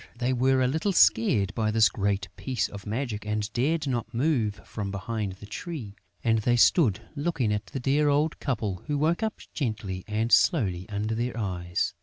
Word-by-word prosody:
But 120 - -22
they 125 +1 +1
were 130 +1 +3
a - - +3
little 160 +9 0
scared 105 - +4
by 110 -1 0
this 110 -1 +5
great 100 +1 -1
piece 125 -5 -1
of 100 0 -10
magic 110 -1 -3
and 105 +1 -2
dared 150 +6 +1
not 125 -4 -2
move 120 -5 +1
from 105 -2 -5
behind 100 0 -3
the 100 +2 -12
tree; 110 - -6 0.3
and 115 -1 +3
they 120 +3 +2
stood 120 - +4
looking 145 -8 0
at 105 0 -3
the 135 - -5
dear 145 +4 +2
old 150 +2 +1
couple, 110 -9 -2
who 145 -1 0
woke 160 +7 +1
up 220 -1 -2
gently 105 - -3
and 110 +2 -1
slowly 95 - +3
under 105 +2 -2
their 120 +1 -2
eyes. 90 -5 -2
115 Hz, 190 wpm, -27 LUFS, 105-135 Hz, 0.3 s, this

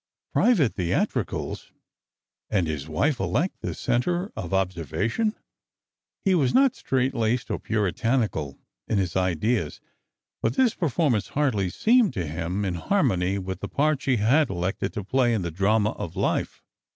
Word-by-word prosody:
Private 175 - +3
theatricals, 90 -2 -2 0.8
and 95 -5 +1
his 75 -2 -4
wife 135 - +1
elect 180 +9 -1
the - - -4
centre 175 - 0
of 85 - -5
observa 95 +1 -1
tion! 220 - 0 0.9
He 195 - +4
was 145 -8 +2
not 270 -1 +5
strait 130 0 0
laced 120 0 0
or - - -1
puritanical 110 - -1 0.3
in 110 - 0
his 90 -3 -1
ideas, 95 0 0 0.6
but 115 +3 0
this 250 -4 +3
performance 145 - 0
hardly 120 -11 0
seemed 225 - +3
to 90 - -1
him 85 +6 -3
in 95 - -1
harmony 90 +3 +1
with 95 -1 -5
the - - -5
part 150 -1 +1
she 130 -3 +1
had 130 +8 +3
elected 95 +1 -2
to 105 - -4
play 120 +3 +2
in 100 - -1
the 85 - -3
drama 105 +5 +2
of - - -7
life. - - -1
110 Hz, 150 wpm, -25 LUFS, 90-135 Hz, 0.9 s, not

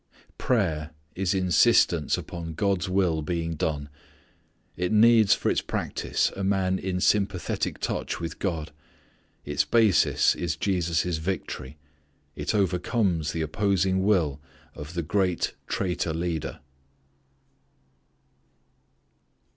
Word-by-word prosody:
Prayer 80 -11 0 0.2
is 95 +1 -1
insistence 90 -3 +3
upon 85 -2 -7
God's 95 0 0
will 90 -4 +1
being 85 +1 -2
done. 75 -2 -2 0.9
It 90 +2 -2
needs 110 -1 +6
for - - 0
its - - +1
practice - - -1
a 100 - -4
man 95 -1 +1
in 90 -1 -2
sympathetic 100 -3 0
touch - - -3
with 85 -1 -6
God. 80 -5 -3 0.7
Its - - +1
basis 110 -7 +3
is 85 -2 -2
Jesus' 85 -3 0
victory. 80 -5 -4 0.6
It - - -2
overcomes 90 - 0
the 80 - -2
opposing 95 +2 +1
will 85 -8 +1 0.3
of 75 +4 -9
the 85 - -1
great 90 +1 0
traitor 90 -4 -1
leader. 85 -3 -3
90 Hz, 105 wpm, -26 LUFS, 80-95 Hz, 0.9 s, needs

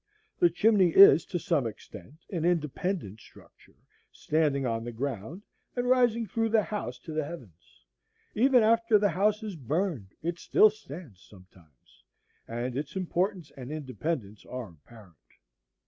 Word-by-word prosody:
The 175 - +5
chimney 195 +1 +3
is 170 -5 +8
to 175 - -3
some 165 -8 0
extent 115 - -12
an 170 -5 -2
independent 165 - -1
structure, - - -19 0.4
standing 150 -3 0
on 115 -2 -2
the 120 - -5
ground 130 - -5 0.3
and 245 0 -1
rising 240 -2 +3
through 225 +3 -1
the 220 -1 +3
house 200 - -5
to 155 - -8
the 155 0 -1
heavens; 95 - -12 0.5
even 250 +1 +4
after 230 0 +4
the 205 0 +2
house 210 +3 +1
is 210 -4 -5
burned 145 - -3
it 170 +1 -3
still 215 - +5
stands 150 - -12
sometimes, 90 - -21 0.4
and 120 +2 -4
its 145 +5 -5
importance 185 -2 -2
and 130 0 -8
independence 135 -7 -4
are 125 -4 -7
apparent. 90 +4 -17
155 Hz, 145 wpm, -28 LUFS, 120-200 Hz, 0.5 s, is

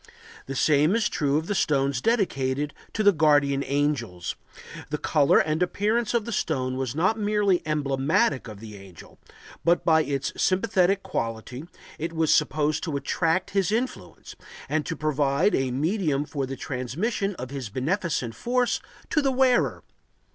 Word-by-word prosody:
The 135 - -5
same 150 - +3
is 230 - +2
true 145 -1 0
of 160 - -2
the 205 - -2
stones 140 - +1
dedicated 145 - 0 0.2
to 215 - 0
the 205 - +7
guardian 145 -4 +3
angels; 135 -12 -1 0.5
the 150 - -2
color 145 -2 +3
and 155 +2 +1
appearance 215 +6 0
of 230 -3 +1
the 235 - -5
stone 130 - -1
was 130 -1 -3
not 185 +8 +1
merely 205 -3 +2
emblematic 140 -2 +1
of 105 -3 -9
the 105 -1 -10
angel, 95 -4 -14 0.4
but, 170 +1 +2
by 160 -1 +5
its 140 -2 -2
sympathetic 195 0 +2
quality, 115 +5 -4 0.3
it 165 +2 -3
was 160 -1 +2
supposed 150 0 +1
to 155 -4 -2
attract 165 +5 0
his 195 -1 +1
influence 240 +4 -4 0.3
and 155 0 -1
to 165 - -2
provide 150 +4 +1
a 135 -1 +1
medium 150 - 0
for 140 -3 -3
the 135 - -5
transmission 175 - -2
of 130 -3 -7
his 135 -5 -5
beneficent 135 - -2
force 245 - 0 0.3
to 300 - +3
the 275 -1 +1
wearer. 255 -1 +2
150 Hz, 155 wpm, -25 LUFS, 135-195 Hz, 0.5 s, the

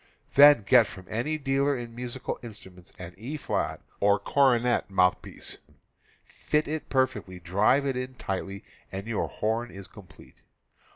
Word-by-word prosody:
Then 145 -5 +8
get 120 -1 +6
from 95 -2 -11
any 130 +8 -1
dealer 140 0 +1
in 120 -1 -8
musi 125 +1 -6
cal - - -3
instruments 95 -6 -11
an 90 -1 -9
E 135 +8 -5
flat - - -2 0.2
or 100 0 +4
cornet 125 +1 +2
mouthpiece, 90 -2 0 0.7
fit 150 0 -1
it 155 +1 -4
perfectly, 130 -9 -1
drive 100 +11 +2
it 135 -2 -1
in 130 +1 -4
tightly 95 -3 -5 0.3
and 95 +1 -5
your 115 -2 -1
horn 115 +3 -2
is 100 -2 -9
complete. 100 -2 -16
120 Hz, 150 wpm, -27 LUFS, 100-135 Hz, 0.7 s, Then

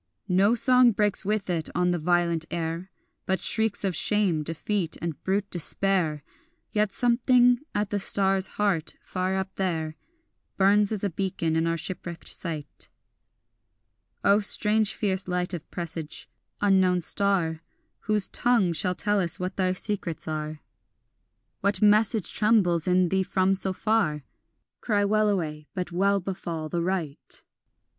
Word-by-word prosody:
No 195 +5 +3
song 250 -1 +5
breaks 205 0 0
with 210 -1 -1
it 170 -3 -2
on 180 0 +1
the 175 - -1
violent 170 0 0
air, 170 +2 -4 0.4
But 190 -1 0
shrieks 220 +2 +2
of 190 -3 -1
shame, 195 -4 +2
defeat, 165 +3 -2
and 165 -3 -6
brute 200 +1 -2
despair; 175 -3 0 0.5
Yet 210 -2 0
something 245 +1 +3 0.2
at 205 -1 -2
the 205 - 0
star's 195 -1 +4
heart 195 -6 -1
far 185 +1 -3
up 190 0 -4
there 160 -5 -2 0.6
Burns 200 +2 +3
as 210 -2 -2
a 200 - -1
beacon 175 -3 -2
in 165 +1 0
our 165 0 -1
shipwrecked 170 0 -6
sight. 160 -4 -3 1.3
O 200 +1 +4
strange 210 +1 +2
fierce 190 -2 -2
light 180 0 -2
of 170 -3 -7
presage, 165 -3 -5 0.3
unknown 190 -3 +2
star, 175 -3 +1 0.4
Whose 210 -2 +7
tongue 235 -8 +1
shall 180 +3 -1
tell 205 +3 0
us 175 -2 +1
what 185 +1 -4
thy 185 -1 0
secrets 185 -4 -3
are, 155 -1 -5 1.0
What 200 -1 +1
message 210 -1 +2
trembles 195 -7 +2
in 180 -1 +2
thee 190 +1 +1
from 190 0 0
so 190 0 -1
far? 185 -7 -1 0.6
Cry 205 -3 0
wellaway, 195 -8 -1
but 180 -2 -4
well 200 +3 +1
befall 170 -4 -6
the 170 +1 -2
right. 170 -5 -4
190 Hz, 140 wpm, -25 LUFS, 170-205 Hz, 1.3 s, Whose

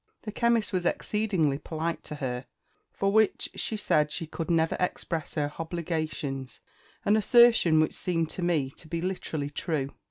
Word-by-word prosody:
The 215 - -5
chemist 230 -1 +1
was 180 -1 0
exceedingly 175 -8 0
polite 160 +2 -3
to 150 - -6
her, 125 -3 -4 0.4
for 195 0 0
which 220 0 +2
she 220 - -2
said 150 -7 +2
she 165 - -3
could 165 +2 -5
never 165 -1 +2
express 170 -3 -2
her 145 -1 0
_h_obligations 155 -5 -3 0.5
an 205 - +4
assertion 220 -7 +6
which 155 - +2
seemed 165 -3 -1
to - - -5
me 160 -6 +1
to 160 - -12
be 170 +1 -3
literally 165 -5 -3
true. 145 -3 -2
165 Hz, 160 wpm, -28 LUFS, 150-190 Hz, 0.5 s, assertion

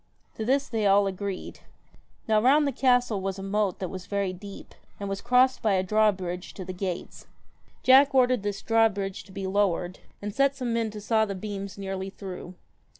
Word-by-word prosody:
To 220 - -5
this 275 +5 +1
they 220 -3 0
all 200 +1 +5
agreed. 195 0 -5 0.7
Now 215 -1 +3
round 285 +5 +5
the 280 - +1
castle 245 -5 +2
was 195 0 -3
a 195 - -7
moat 200 -1 0
that 185 - -4
was 185 -1 -8
very 200 -2 -1
deep, 200 +2 -11 0.3
and 200 - -4
was 195 0 -4
crossed 250 +2 +3
by 215 -3 +2
a 185 -1 +2
drawbridge 190 -3 0
to 190 - -7
the 185 - -5
gates. 180 -1 -5 0.6
Jack 270 +2 +6
ordered 250 -3 +4
this 205 -1 -4
drawbridge 210 -4 +1
to 195 - -16
be 195 0 -5
lowered, 190 -2 0 0.2
and 205 0 -5
set 275 +2 +2
some 250 -3 -2
men 230 -1 0
to 210 0 -8
saw 220 +1 +2
the 200 -2 -5
beams 200 0 -6
nearly 195 -1 -4
through. 185 -2 -8
205 Hz, 195 wpm, -27 LUFS, 190-230 Hz, 0.7 s, Jack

